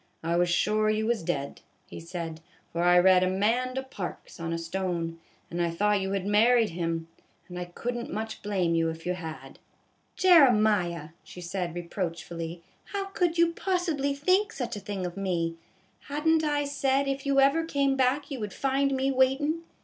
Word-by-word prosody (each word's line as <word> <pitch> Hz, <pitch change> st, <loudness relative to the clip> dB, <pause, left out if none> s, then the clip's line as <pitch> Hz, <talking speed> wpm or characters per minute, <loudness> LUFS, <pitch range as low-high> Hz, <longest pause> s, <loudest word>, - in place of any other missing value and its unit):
"I 165 Hz, +1 st, 0 dB
was 175 Hz, 0 st, +2 dB
sure 215 Hz, +4 st, +2 dB
you 215 Hz, 0 st, +1 dB
was 235 Hz, 0 st, 0 dB
dead," 160 Hz, -5 st, -3 dB, 0.2 s
he -, -, -9 dB
said, 165 Hz, -1 st, -6 dB
" -, -, -34 dB
for 170 Hz, -, -2 dB
I 175 Hz, 0 st, +5 dB
read 185 Hz, +1 st, +6 dB
Amanda 235 Hz, +8 st, 0 dB
Parks 200 Hz, -12 st, -7 dB
on 165 Hz, 0 st, -3 dB
a 165 Hz, -, -1 dB
stone, 165 Hz, -1 st, -3 dB, 0.3 s
and 175 Hz, +1 st, -2 dB
I 170 Hz, -, +1 dB
thought 205 Hz, +4 st, +1 dB
you 190 Hz, +1 st, -2 dB
had 195 Hz, -1 st, -1 dB
married 225 Hz, +2 st, +4 dB
him; 165 Hz, -1 st, -2 dB, 0.4 s
and 180 Hz, -1 st, -7 dB
I 180 Hz, -, -3 dB
could 235 Hz, +8 st, -4 dB
n't 240 Hz, 0 st, -5 dB
much 220 Hz, 0 st, -4 dB
blame 190 Hz, -5 st, 0 dB
you 165 Hz, 0 st, +2 dB
if 160 Hz, 0 st, -7 dB
you 180 Hz, -, 0 dB
had." 160 Hz, -7 st, -8 dB, 0.3 s
" -, -, -41 dB, 0.2 s
Jeremiah," 215 Hz, -, +4 dB
she -, -, -12 dB
said, 175 Hz, -1 st, -4 dB
reproachfully, 170 Hz, -1 st, -5 dB
" -, -, -38 dB
how 395 Hz, -1 st, -2 dB
could 350 Hz, -3 st, 0 dB
you 335 Hz, 0 st, +4 dB
possibly 330 Hz, -7 st, -1 dB
think 370 Hz, +9 st, +2 dB
such 240 Hz, -, -4 dB
a -, -, -5 dB
thing 195 Hz, -2 st, -4 dB
of 175 Hz, +1 st, -6 dB
me? 170 Hz, -4 st, -1 dB, 0.5 s
Had 295 Hz, +2 st, -4 dB
n't 320 Hz, 0 st, +4 dB
I 290 Hz, -1 st, +1 dB
said 275 Hz, -1 st, +1 dB
if 275 Hz, 0 st, -2 dB
you 275 Hz, 0 st, +3 dB
ever 280 Hz, +4 st, +4 dB
came 280 Hz, -4 st, +1 dB
back 270 Hz, +3 st, +1 dB
you 270 Hz, -, -4 dB
would 210 Hz, -3 st, -5 dB
find 275 Hz, 0 st, +1 dB
me 265 Hz, +1 st, +1 dB
waitin 270 Hz, +5 st, +2 dB
210 Hz, 195 wpm, -28 LUFS, 175-275 Hz, 0.5 s, read